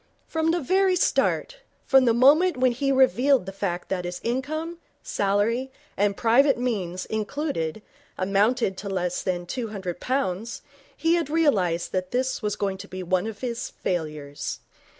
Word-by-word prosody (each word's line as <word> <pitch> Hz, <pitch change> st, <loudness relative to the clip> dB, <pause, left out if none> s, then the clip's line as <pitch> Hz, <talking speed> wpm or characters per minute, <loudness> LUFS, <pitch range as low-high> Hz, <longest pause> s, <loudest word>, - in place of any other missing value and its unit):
From 320 Hz, 0 st, 0 dB
the 345 Hz, +1 st, +2 dB
very 375 Hz, +5 st, +3 dB
start, -, -, +1 dB, 0.3 s
from 265 Hz, -2 st, +5 dB
the 235 Hz, -, +4 dB
moment 295 Hz, +7 st, +5 dB
when 255 Hz, 0 st, +3 dB
he 275 Hz, +3 st, 0 dB
revealed 265 Hz, -2 st, +4 dB
the 195 Hz, -, -5 dB
fact 185 Hz, -2 st, -3 dB
that 185 Hz, -2 st, -1 dB
his 175 Hz, 0 st, -5 dB
income, 310 Hz, +8 st, -3 dB, 0.2 s
salary 210 Hz, +6 st, 0 dB, 0.2 s
and 200 Hz, 0 st, +1 dB
private 265 Hz, +5 st, +4 dB
means 195 Hz, -8 st, -2 dB
included, 220 Hz, -, -3 dB, 0.3 s
amounted 200 Hz, +2 st, +1 dB
to 200 Hz, -, -5 dB
less 180 Hz, -2 st, -1 dB
than 175 Hz, -2 st, -2 dB
two 235 Hz, +5 st, -3 dB
hundred 190 Hz, -5 st, -5 dB
pounds, 230 Hz, -4 st, -2 dB, 0.3 s
he 330 Hz, +1 st, +2 dB
had 335 Hz, -4 st, 0 dB
realized 200 Hz, -, +1 dB
that 185 Hz, -1 st, -2 dB
this 255 Hz, +3 st, -1 dB
was 210 Hz, -2 st, -1 dB
going 195 Hz, -2 st, -2 dB
to 200 Hz, -, -8 dB
be 185 Hz, -1 st, -6 dB
one 185 Hz, +3 st, 0 dB
of 220 Hz, -2 st, -7 dB
his 240 Hz, -2 st, -3 dB
failures. 150 Hz, -5 st, -4 dB
225 Hz, 160 wpm, -25 LUFS, 185-270 Hz, 0.3 s, from